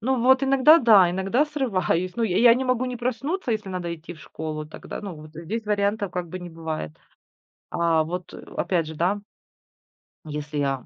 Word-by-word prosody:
Ну, 255 +2 0
вот 260 +2 +5
иногда, 275 +4 +6
да, 205 - +6
иногда 195 +10 +1
срываюсь. 190 - -1
Ну, 235 - 0
я 190 -5 0
я 235 -1 +7
не 260 +1 -1
могу 255 0 +1
не 250 -1 -3
проснуться, 255 - -2
если 210 -3 -3
надо 175 -2 -3
идти 165 +1 -10
в 155 - -16
школу, 155 -1 -6
тогда, 155 - -8
ну, 195 -4 -6
вот 155 0 -12
здесь 205 +8 -5
вариантов, 205 -1 0
как 180 -2 -3
бы, 185 - -6
не 175 -1 -8
бывает. 160 - -5 0.8
А 165 -2 +2
вот, 180 +2 -6
э, - - -9 0.2
опять 170 -4 0
же, 160 - -7
да. 185 +6 0 1.1
Если 150 0 -5
я 135 -3 -1
185 Hz, 195 wpm, -24 LUFS, 165-240 Hz, 1.1 s, я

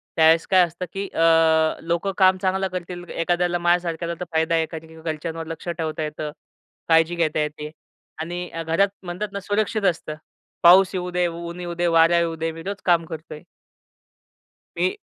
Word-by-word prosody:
त्यावेळेस 165 +1 +5
काय 185 -1 +5
असतं, 175 +2 -6
की 195 +1 -3
अ, 160 -1 +3
लोकं 170 +3 0
काम 185 -1 +5
चांगलं 190 0 0
करतील 175 0 -5 0.2
एखाद्याला 175 0 +1
माझ्यासारख्याला 170 -1 +1
तर 180 - -4
फायदा 160 +1 +1
आहे 165 - +2
एखाद्या, 160 0 -8
की 160 0 -14
घरच्यांवर 160 +1 -4
लक्ष 165 - -12
ठेवता 160 -2 -3
येतं, 150 0 -5 0.6
काळजी 165 +1 +4
घेता 155 -1 0
येते 150 0 -3 0.5
आणि 175 +2 -4
अ, 165 0 -5
घरात 165 +5 +2
म्हणतात 180 +4 -4
ना 200 - -3
सुरक्षित 215 0 0
असतं. 155 -1 -8 0.5
पाऊस 185 +3 +7
येऊ 180 -1 -3
दे, 180 - +2
ऊन 170 +1 -7
येऊ 175 -1 -5
दे, 175 - +2
वारा 165 +1 +5
येऊ 165 -1 -1
दे. 165 0 -2
मी 165 0 -9
रोज 200 +2 -5
काम 170 -2 +3
करतोय. 155 -1 -9 1.3
ते. 390 +2 0
170 Hz, 175 wpm, -23 LUFS, 160-180 Hz, 1.3 s, पाऊस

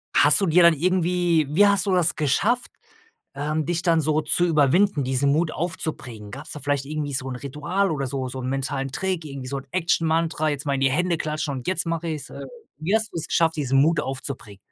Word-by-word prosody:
hast 145 +5 +6
du 195 - +1
dir 170 +2 +5
dann 170 -1 +7
irgendwie 175 -1 +1
wie 200 +7 +4
hast 200 -2 +2
du 190 - 0
das 175 -2 +2
geschafft, 200 - 0 0.6
ähm, 150 +2 -2
dich 170 0 -1
dann 165 -2 +3
so 155 +1 +1
zu 155 +3 +3
überwinden, 160 +1 +2
diesen 135 +2 +1
Mut 160 +1 0
aufzubringen? 125 - -5
Gab's 140 +6 -5
da 150 - -5
vielleicht 145 -1 -1
irgendwie 145 -1 -4
so 130 0 -1
'n 125 - -5
Ritual 150 +9 -2
oder 140 -4 -2
so 130 0 -3
so 130 +1 -6
'n 130 - -4
mentalen 135 0 -2
Trick, 185 -2 -2
irgendwie 135 -3 -7
so 140 - -3
'n 135 - -11
Action 170 -2 0
Mantra, 160 -1 0
jetzt 145 0 -3
mal 140 - 0
in 135 - -2
die 135 0 +3
Hände 175 +5 0
klatschen 155 -2 -3
und 130 -2 -7
jetzt 180 -2 +2
mache 165 0 -2
ich's. 150 -3 -5
Äh, - - -8 0.3
wie 165 +7 -1
hast 220 -1 +2
du's 165 -1 -3
geschafft, 165 -1 +1
diesen 135 -2 +1
Mut 155 +2 +3
aufzubringen? 130 -7 -6
155 Hz, 225 wpm, -23 LUFS, 140-170 Hz, 0.6 s, dann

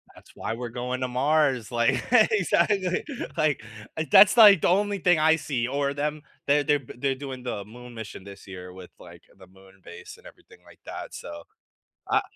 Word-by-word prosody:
That's - - -18
why - - -4
we're 120 0 -6
going 125 +2 -5
to 130 - -1
Mars, 135 -2 0
like 120 +2 +1
exactly. 195 -5 +2 0.3
Like, 150 -7 0 0.3
uh, 160 - -2
that's, 210 - +7
like, 205 -7 +8
the - - +2
only 205 +3 +1
thing 175 -3 +2
I 160 +1 +4
see, 135 -6 -3
or 140 +1 -2
them 150 +1 -3 0.2
they're 145 +1 +3
they're 145 -1 +1
b 130 - -13
they're 135 +1 -1
doing 130 -2 -8
the 115 -5 -5
moon 120 +4 -13
mission 110 -4 -9
this 100 0 -13
year 90 -1 -10
with, 90 -1 -12
like, - - -15
the 95 -1 -16
moon 95 +1 -21
base - - -12
and - - -22
everything - - -17
like - - -18
that. - - -8
So, 85 0 -9 0.7
I - - +3
135 Hz, 195 wpm, -25 LUFS, 115-155 Hz, 0.7 s, like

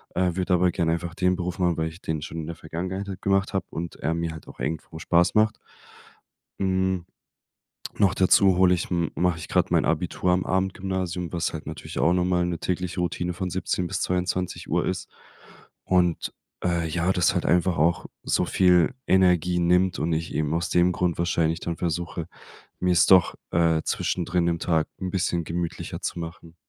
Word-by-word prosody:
äh, 90 -1 +1
würde 90 0 +1
aber 90 0 +3
gerne 80 -2 +1
einfach 85 0 -4
den 90 0 +1
Beruf 90 0 -4
machen, 90 -2 +2
weil 80 0 -1
ich 80 +2 -13
den 80 -2 -3
schon 80 +1 -7
in 80 -1 -4
der 85 - -5
Vergangenheit 95 +5 -5
halt 95 -1 -7
gemacht 95 +1 +1
habe 95 - -1
und 85 0 -6
er 80 +3 -1
mir 85 0 -2
halt 80 -1 -10
auch - - -13
irgendwo 80 +4 -4
Spaß 85 +2 +2
macht. 110 0 +3 1.0
Hm. 95 -2 0 0.9
Noch 100 -3 +4
dazu 95 0 +5
hole 90 0 +5
ich 90 - -2
m 85 -2 0
mache 90 -2 +1
ich 80 - -8
gerade - - +2
mein - - +3
Abitur 90 - 0
am 90 +1 +1
Abendgymnasium, 95 -2 -2
was 85 -1 -1
halt 80 - -7
natürlich - - -6
auch 85 - +4
nochmal 90 -1 +1
'ne 85 -1 -2
tägliche 90 0 -2
Routine 90 0 -2
von 90 +1 -3
17:00 90 0 -1
bis - - -3
22:00 90 0 -1
ist. - - -3 0.7
Und, 90 -2 +1 0.3
äh, 85 -2 0
ja, 85 +3 0
das 90 -2 +2
halt - - -1
einfach 90 +1 +2
auch 85 +3 +2 0.2
so - - +1
viel 90 -1 +4
Energie 90 -2 +3
nimmt 90 +1 +2
und 80 +3 0
ich 80 +1 -3
eben 75 0 0
aus 85 +1 -1
dem 90 +1 +3
Grund 90 -1 0
wahrscheinlich 85 -1 +1
dann 85 -1 -3
versuche, 85 0 -3 0.5
mir 90 0 +2
es 85 - +5
doch, 95 -2 +5 0.2
äh, 80 -1 +3
zwischendrin 90 -1 0
im 85 -1 0
Tag 80 -3 +1
'n 95 -1 -3
bisschen 90 -2 0
gemütlicher 85 +1 -4
zu - - -3
machen. 85 0 -8
90 Hz, 190 wpm, -25 LUFS, 85-90 Hz, 1.0 s, dazu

